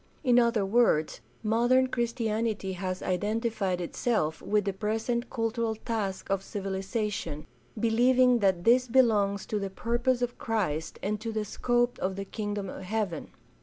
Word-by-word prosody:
In 245 -3 +5
other 235 -4 +2
words, 195 - +2 0.2
modern 240 +4 +3
Christianity 230 -5 -1
has 185 0 -4
identified 205 -1 -1
itself 170 -2 -1
with 210 -1 +1
the 195 - -1
present 225 +4 -2
cultural 225 -2 -1
task 215 -4 -3
of 195 -1 +1
civilization, 195 -4 -3 0.3
believing 245 +2 +4
that 190 -4 +2
this 250 +4 +4
belongs 215 -6 +3
to 210 - -2
the 195 -1 -3
purpose 240 +5 0
of 245 0 -3
Christ 180 -9 -2
and 210 +1 -1
to 225 0 -3
the 215 -1 -2
scope 240 +3 0
of 190 0 -1
the 195 0 -5
Kingdom 205 -1 -4
of 185 - -7
Heaven. 195 -2 -3
215 Hz, 145 wpm, -28 LUFS, 195-235 Hz, 0.3 s, In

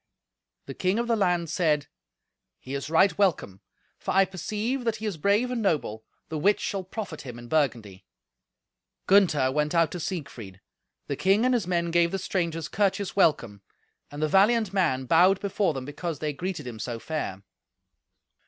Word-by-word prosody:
The - - -7
king 185 +3 0
of 235 0 -1
the 235 - +2
land 180 -5 +1
said, 155 -5 +1 0.7
"He 130 - -9
is 140 +2 -4
right 185 +5 +4
welcome, 155 - 0 0.4
for - - -7
I 195 0 +6
perceive 215 - -3
that 230 -2 0
he 220 0 -7
is 210 -4 -2
brave 200 +10 +1
and 245 -2 -2
noble, 145 - -1 0.3
the 155 - -3
which 200 +7 +3
shall 195 -2 -3
profit 185 -4 -6
him 125 -3 -8
in 120 0 -10
Burgundy." 120 -10 -1 1.0
Gunther 165 -10 +4
went 150 +3 0
out 165 -2 +3
to 180 - -5
Siegfried. 125 - -6 0.5
The 140 - -3
king 195 - +2
and 255 - +3
his 225 -7 0
men 170 -2 0
gave 170 0 +3
the 195 - -2
strangers 170 -4 -2
courteous 200 +1 -1
welcome, 120 - +2 0.5
and 145 +1 -5
the - - +3
valiant 205 +4 +3
man 155 -10 +1
bowed 180 +7 +4
before 195 -5 0
them 130 -1 -5
because 150 +3 -5
they 150 +1 -3
greeted 165 0 -5
him 120 -3 -7
so 115 +2 -4
fair. 115 -8 -5
170 Hz, 175 wpm, -26 LUFS, 145-195 Hz, 1.0 s, I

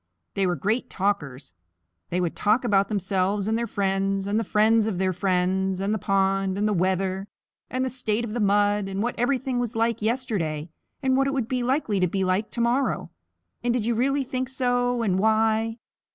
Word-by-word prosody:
They 195 -1 +1
were 175 - +1
great 215 - -1
talkers. 145 - -2 0.6
They 180 - -1
would 175 -2 -1
talk 215 +5 +2
about 200 -4 +3
themselves, 195 0 0
and 220 - +1
their 235 +1 -1
friends, 195 -1 0
and 205 +2 +1
the - - 0
friends 220 +1 +3
of 205 -5 -2
their 185 0 +1
friends, 185 +1 0
and 200 +2 0
the 215 - -1
pond, 195 0 +1
and 210 +1 +1
the 210 - +1
weather, 190 +1 0 0.4
and 255 +1 -1
the - - -1
state 235 -3 -1
of 215 - -6
the 240 - -2
mud, 205 -1 +2
and 195 +2 -2
what 240 - -1
everything 255 0 0
was 240 -1 -3
like 230 0 0
yesterday, 200 - -1 0.3
and 260 0 +3
what 270 0 +3
it 275 - -1
would 260 -5 -1
be 255 0 -1
likely 245 -5 0
to 180 - +3
be 190 +2 -1
like 185 +4 0
to 235 - -3
morrow, 245 +3 0 0.5
and 240 0 +1
did 230 -4 -1
you 235 - +1
really 275 +4 +1
think 255 0 -3
so, 245 -2 0
and 190 -4 +1
why? 220 +1 +2
210 Hz, 205 wpm, -25 LUFS, 190-240 Hz, 0.6 s, about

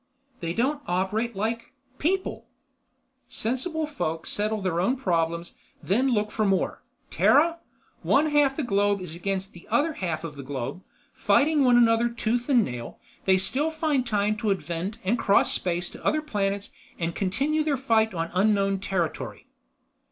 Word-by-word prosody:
"They 170 0 -3
don't 280 +5 0
operate 205 +6 -1
like 225 +4 -3 0.3
people. 375 +5 -1 0.8
Sensible 310 +8 -2
folk 165 - -3
settle 215 +1 -1
their 180 -3 0
own 245 +8 +2
problems, 170 -6 -1 0.3
then 240 +8 +2
look 210 -3 0
for 220 - 0
more. 195 -2 0 0.3
Terra? 335 +3 +4 0.4
One 295 - +3
half 290 -2 +4
of - - -18
the 310 - -1
globe 205 -3 +2
is 180 -3 -6
against 195 +2 -3
the 175 - -14
other 315 +2 +2
half 170 - -3
of 150 -3 -7
the - - -6
globe. 135 +4 -5 0.3
Fighting 300 0 +3
one 245 -2 +5
another 235 0 +4
tooth 235 +1 -2
and 245 -5 +5
nail, 120 -2 -6 0.3
they 190 -1 +5
still 270 +11 0
find 310 -5 0
time 210 -1 +1
to 220 -1 -1
invent 175 +2 -2
and 220 +6 +1
cross 200 -2 +4
space 175 0 -1
to - - -12
other 310 0 +1
planets 200 -7 -2 0.3
and 170 -1 -2
continue 275 - 0
their 295 -3 0
fight 225 -4 +2
on 165 -2 -3
unknown 195 0 +2
territory." 185 -4 -3
210 Hz, 160 wpm, -26 LUFS, 185-260 Hz, 0.8 s, one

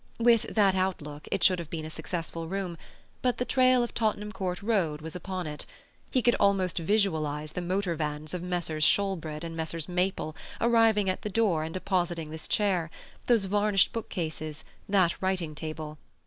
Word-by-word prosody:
With 235 -1 +4
that 200 -3 +5
outlook 165 -6 -2
it - - 0
should 185 -2 +5
have 165 -3 -6
been 160 -2 -4
a 155 - -7
successful 165 0 -4
room, 190 -1 -3 0.5
but 250 -1 +1
the 250 - -1
trail 255 -1 +4
of 240 - -4
Tottenham 210 -2 0
Court 190 -2 -3
Road 185 -9 +1
was 160 +2 -7
upon 185 0 -4
it; 150 -1 -5 0.4
he 255 -3 +1
could 240 - +5
almost 195 -3 +2
visualize 160 -6 +1
the 180 - -3
motor 185 0 0
vans 150 0 -3
of 180 - -3
Messrs. 175 -3 -2
Shoolbred 165 -5 +1
and 165 -1 -5
Messrs. 160 0 -3
Maple 180 -3 -1 0.2
arriving 225 -3 +4
at 185 - 0
the 210 - -3
door 200 -7 +2
and 160 +2 -5
depositing 175 -4 -1
this 160 0 -7
chair, 185 -6 +1 0.4
those 230 -5 +4
varnished 205 0 +3
book 230 - -4
cases, 155 -3 -4 0.3
that 185 -4 +3
writing 185 -4 0
table. 155 0 -6
180 Hz, 175 wpm, -29 LUFS, 160-200 Hz, 0.5 s, that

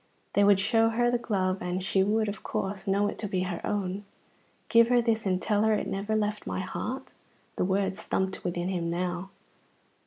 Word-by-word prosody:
They 205 - +4
would 200 -1 +6
show 225 +3 +3
her 240 +2 +2
the 245 - +1
glove, 190 -4 0
and 180 +1 -2
she 190 0 +2
would, 215 +3 +2
of 205 +1 -4
course, 195 +1 -3
know 200 +1 +2
it - - -5
to 210 - -2
be 185 -2 -1
her 180 -2 -3
own. 200 -1 -2 0.6
"Give 230 0 +6
her 245 0 +4
this 225 -3 +1
and 185 -1 +1
tell 210 +1 +1
her 220 0 +4
it - - -1
never 200 +3 -2
left 210 -1 -1
my - - -2
heart." 260 +8 -5 0.4
The - - 0
words 190 +1 0
thumped 190 0 -2
within 175 +1 -2
him 175 -3 -1
now. 180 +2 -2
200 Hz, 205 wpm, -28 LUFS, 185-220 Hz, 0.6 s, would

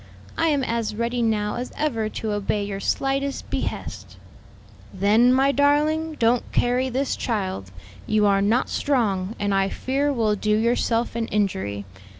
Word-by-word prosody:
I 330 - +1
am 290 -4 +1
as 230 -3 -2
ready 235 +2 -1
now 215 -2 0
as 245 +1 -5
ever 230 -8 -1
to 220 0 -4
obey 205 0 -1
your 200 -1 -4
slightest 275 +5 -1
behest." - - -4 0.7
"Then, 210 +6 +4
my 270 +2 +4
darling, 300 +3 +2
don't 235 +1 +1
carry 250 +2 +1
this 265 +2 -1
child. 190 - -3 0.4
You 215 -1 +3
are 200 -1 +3
not 220 +6 +2
strong, 220 -7 0
and 205 -1 0
I 195 0 +2
fear 275 +6 -1
will 225 -5 +1
do 210 +1 +1
yourself 235 0 +1
an 230 -1 -1
injury. 100 - -1
230 Hz, 155 wpm, -23 LUFS, 205-265 Hz, 0.7 s, Then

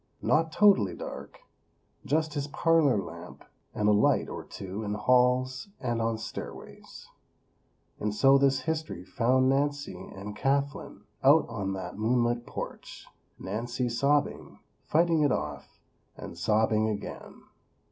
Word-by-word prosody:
Not 160 +1 +2
totally 205 +1 +4
dark; - - -9 0.7
just 155 0 0
his 145 -1 -3
parlor 150 -4 +3
lamp, 85 -2 -9 0.3
and 105 - 0
a - - +5
light 105 0 +3
or - - -6
two 95 +2 -7
in 105 0 -3
halls 125 - +2
and 120 -2 -2
on 115 0 0
stairways. 110 +1 -9 0.9
And 105 - -1
so 135 +6 +5
this 135 -1 +2
history 155 - -4
found 130 +5 +2
Nancy 145 +1 -1
and 100 +2 -7
Kathlyn 140 +4 -2 0.2
out 145 +4 +5
on 100 -4 -3
that 95 +1 -6
moon 120 +3 +2
lit 120 0 -2
porch; - - -7 0.3
Nancy 120 +5 -3
sobbing, 140 +5 0 0.3
fighting 165 0 +2
it 145 -3 +3
off, 75 - -4 0.4
and - - -8
sobbing 110 0 +1
again. 105 -1 -7
125 Hz, 130 wpm, -28 LUFS, 105-145 Hz, 0.9 s, a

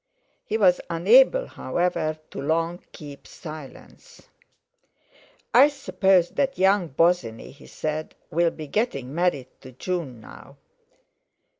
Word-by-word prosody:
He 220 - -1
was 185 -5 +4
unable, 245 - +5
however, 175 -3 -2
to - - -6
long 165 +4 -1
keep 145 -4 -11
silence. 155 - -12 1.2
"I 270 +4 +8
suppose 195 - +1
that 275 -1 -1
young 190 -1 +3
Bosinney," 140 -7 0
he 140 - -16
said, 155 0 -5 0.2
"will 170 +1 +2
be 155 -1 -9
getting 140 - -2
married 160 -6 0
to 130 - -12
June 150 -4 -4
now?" - - -14
170 Hz, 115 wpm, -24 LUFS, 150-195 Hz, 1.2 s, I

